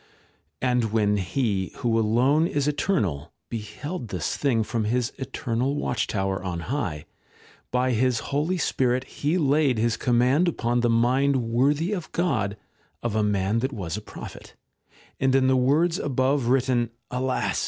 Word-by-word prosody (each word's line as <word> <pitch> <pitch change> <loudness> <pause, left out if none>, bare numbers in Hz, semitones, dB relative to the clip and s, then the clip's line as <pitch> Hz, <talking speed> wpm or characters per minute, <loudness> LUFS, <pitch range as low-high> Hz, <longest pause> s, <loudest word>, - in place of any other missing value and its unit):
And 125 -2 +2
when 105 -2 +2
He, 95 0 -1
who 115 -2 +1
alone 130 +9 +3
is 145 -3 -1
eternal, 100 - -1 0.2
beheld 120 +7 -5
this 90 -7 -2
thing 120 -6 +1
from 115 0 -2
his 120 +2 0
eternal 130 0 -2
watch 120 -5 -1
tower 95 -2 -1
on 85 -3 -3
high, 90 - -3 0.6
by 125 +1 +1
his 125 +1 +2 0.2
Holy 155 +6 +1
Spirit 130 -5 +1
He 150 +5 -1
laid 145 -4 +2
his 115 +1 +1
command 125 +8 +3
upon 120 -7 0
the 120 0 +2
mind 130 +5 +3
worthy 140 - +1
of 180 -5 -5
God 110 - 0 0.5
of 120 -3 -1
a 110 - +2
man 105 +1 +1
that 130 +4 -1
was 95 -7 -4
a 105 - -5
prophet, - - -10 0.6
and 130 0 +2
in 135 -1 +4
the 130 0 +4
words 155 +7 +2
above 135 -1 +1
written, 125 -2 +2 0.2
alas 130 +1 -1
125 Hz, 155 wpm, -25 LUFS, 110-140 Hz, 0.6 s, in